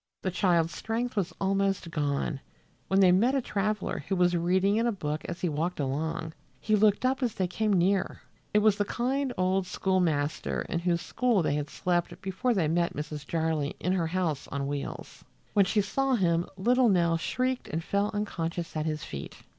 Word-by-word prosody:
The 185 - 0
child's 170 -2 +2
strength 230 +2 -2
was 190 -4 0
almost 195 -2 0
gone, 145 -2 -1 0.5
when 195 +1 +3
they 185 -2 +7
met 230 +9 +3
a - - +3
traveler 210 -2 -2
who 195 - 0
was 180 -1 +3
reading 185 +4 +2
in 230 +1 +2
a - - +2
book 155 -7 -3
as 175 - -6
he 180 - +1
walked 165 +3 -2
along. 160 +4 -2 0.3
He 215 - +2
looked 210 +3 +3
up 265 +1 +1
as 240 -4 0
they 185 - 0
came 215 +4 -1
near. 190 +1 +1 0.3
It 210 0 +3
was 215 -2 +4
the 205 - +1
kind 260 +5 -1
old 185 +1 +1
schoolmaster 165 -7 0
in 170 - -2
whose 170 -1 0
school 235 -6 +1
they 145 - +1
had 145 0 -2
slept 175 +1 -1
before 195 +6 -1
they 175 -6 +2
met 170 +2 0
Mrs. 150 -1 -5
Jarley 160 -3 -1
in 180 - 0
her 170 -3 +1
house 160 -5 -1
on 140 -1 -3
wheels. 140 0 -5 0.3
When 200 -2 +5
she 210 +3 +2
saw 265 +6 +1
him 170 -5 +1
little 245 +5 +3
Nell 170 -3 +3
shrieked 255 +8 -1
and 160 +2 -3
fell 200 +3 0
unconscious 175 -5 -3
at 155 0 -1
his 155 -1 -2
feet. 70 -1 -7
185 Hz, 195 wpm, -28 LUFS, 165-210 Hz, 0.5 s, they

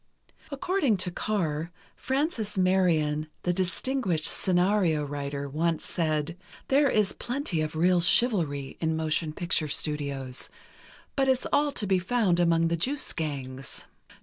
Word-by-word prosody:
According 285 - +1
to 180 -1 -1
Carr, 170 -6 -2 0.3
Frances 265 - -2
Marion, 165 -5 +2 0.2
the 180 - +1
distinguished 185 - -1
scenario 180 -4 +2
writer, 140 0 -4
once 160 +3 -1
said: 155 -1 -1 0.3
"There 280 +1 +4
is 210 -4 +2
plenty 245 - -3
of 155 0 -3
real 175 +2 +3
chivalry 165 - +2
in 160 -1 +1
motion 155 0 0
picture 165 -1 0
studios, 140 -3 -2 0.7
but 270 -1 +2
it's 260 -1 +2
all 290 0 +3
to 210 - -1
be 190 -1 +2
found 185 -2 +1
among 165 -1 +3
the 170 - +1
juice 270 - 0
gangs." 135 -5 -5
175 Hz, 130 wpm, -27 LUFS, 155-210 Hz, 0.7 s, There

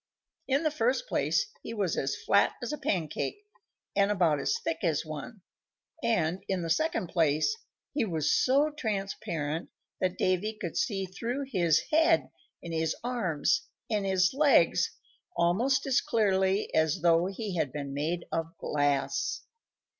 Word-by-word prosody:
In 275 +4 +2
the 310 - +2
first 260 - 0
place - - +1 0.2
he - - -6
was 195 -6 0
as 135 - -1
flat 200 - +3
as 245 - -3
a - - -3
pancake, 185 - -2 0.5
and 200 0 +3
about 175 -7 +2
as 140 - 0
thick 160 - -3
as 165 -4 0
one; 155 - -7 0.6
and, 180 -5 0
in 190 -3 -1
the 165 - -2
second 310 - 0
place, 160 - +2 0.4
he 285 - +1
was 165 -8 0
so 280 +4 +3
transparent 195 - -3 0.3
that 185 -1 0
Davy 195 +4 0
could 175 - -4
see 195 -6 0
through 230 +9 -4
his 170 -6 +3
head 325 +1 +3 0.3
and 170 - -6
his 160 0 0
arms 220 -12 0 0.2
and 210 -2 +1
his 190 0 +2
legs 290 +1 +4 0.5
almost 240 +11 +2
as 270 -2 +3
clearly 195 -2 +1
as 160 -1 +2
though 170 +1 +4
he 195 0 -4
had 150 -5 0
been 140 -1 -5
made 165 +5 -2
of 165 +1 -3
glass. 140 -2 0
190 Hz, 150 wpm, -29 LUFS, 160-230 Hz, 0.6 s, legs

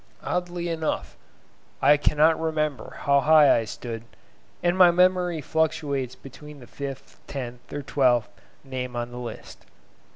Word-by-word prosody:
Oddly 175 -1 -2
enough, 160 -2 -3 0.6
I 145 - +6
cannot 150 +2 +3
remember 155 -3 -2
how 140 0 +4
high 150 0 +6
I 115 - 0
stood, 115 +1 -6 0.6
and 175 0 +2
my 185 -2 +7
memory 180 -1 +2
fluctuates 145 -4 -1
between 150 +2 -12
the 125 - -12
fifth, 135 +1 -8
tenth, 125 -3 -7
or 145 - -5
twelfth, 125 -4 +2 0.4
name 125 -2 -5
on 120 0 -3
the 120 - -7
list. 120 -1 -9
145 Hz, 135 wpm, -25 LUFS, 125-160 Hz, 0.6 s, my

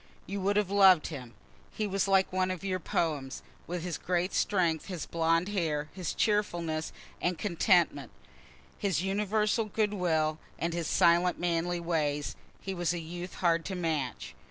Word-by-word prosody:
You 195 +1 -4
would 200 +2 +1
have 205 -2 +1
loved 190 -5 +6
him. 125 -5 -8 0.4
He 215 - -2
was 195 -1 0
like 190 -1 +3
one 185 0 +1
of 185 -1 -4
your 185 -1 -1
poems. 150 -6 -2 0.2
With 175 -1 -4
his 180 -2 -3
great 180 +1 -1
strength, 175 -6 +1
his 180 -5 -4
blond 165 +2 +1
hair, 155 -7 -1
his 180 -3 -4
cheerfulness 175 -7 0 0.3
and 175 -1 0
contentment, 170 - +2 0.7
his 190 -4 0
universal 210 +3 +1
good 210 0 0
will, 160 -5 +1 0.2
and 170 0 -2
his 170 -2 -2
silent 175 0 +4
manly 175 0 0
ways, 150 -4 -1 0.3
he 195 - -4
was 175 -2 0
a - - -3
youth 175 +2 -7
hard 170 -2 +2
to 190 - -3
match. 155 -8 -2
175 Hz, 160 wpm, -30 LUFS, 165-195 Hz, 0.7 s, loved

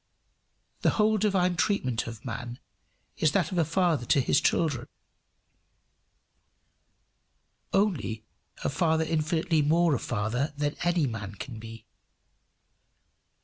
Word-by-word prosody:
The - - +4
whole 215 0 +3
divine 185 -4 +2
treatment 130 - 0
of 115 +3 -8
man 120 0 -5 0.6
is 155 -2 +2
that 175 -5 +1
of 180 - 0
a - - +4
father 165 -4 +1
to - - +4
his 130 - +2
children 140 -8 +1 2.8
only 160 - 0 0.4
a - - +1
father 160 +2 +1
infinitely 160 0 +1
more 165 +2 +3
a 130 - 0
father 120 +7 -2
than 145 0 -1
any 175 -3 +2
man 105 -5 -5
can 120 0 -7
be. 115 0 -10
150 Hz, 115 wpm, -28 LUFS, 120-175 Hz, 2.8 s, The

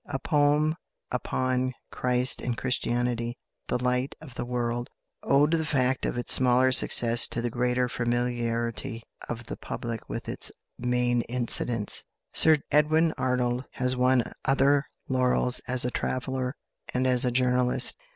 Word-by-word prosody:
A - - -3
poem 150 +3 +1 0.3
upon 130 0 -1 0.2
Christ 125 0 +1
and 120 -2 -3
Christianity 120 -1 -1 0.3
"The - - 0
Light 125 +2 -1
of 150 -6 -12
the 120 - -5
World," 120 0 -3 0.3
owed 145 +2 +3
the 165 -1 +1
fact 130 -3 0
of - - -4
its 120 - +4
smaller 130 0 +3
success 120 -2 +5
to - - -4
the 120 0 -2
greater 125 +1 0
familiarity 120 0 -2 0.3
of 120 0 -5
the - - -7
public 115 -2 -6
with - - -6
its - - +2 0.3
main 125 0 +1
incidents. 120 -2 +1 0.3
Sir 160 -1 +5
Edwin 155 +2 +3
Arnold 125 0 -1
has 125 0 -1
won 125 0 +3 0.2
other 140 +1 +3 0.2
laurels 125 -1 +2
as 125 0 +3
a 125 - -1
traveller 130 +1 -3 0.4
and 130 +1 +1
as 125 -1 +3
a 125 - +2
journalist. 125 0 +2
125 Hz, 140 wpm, -26 LUFS, 120-130 Hz, 0.4 s, success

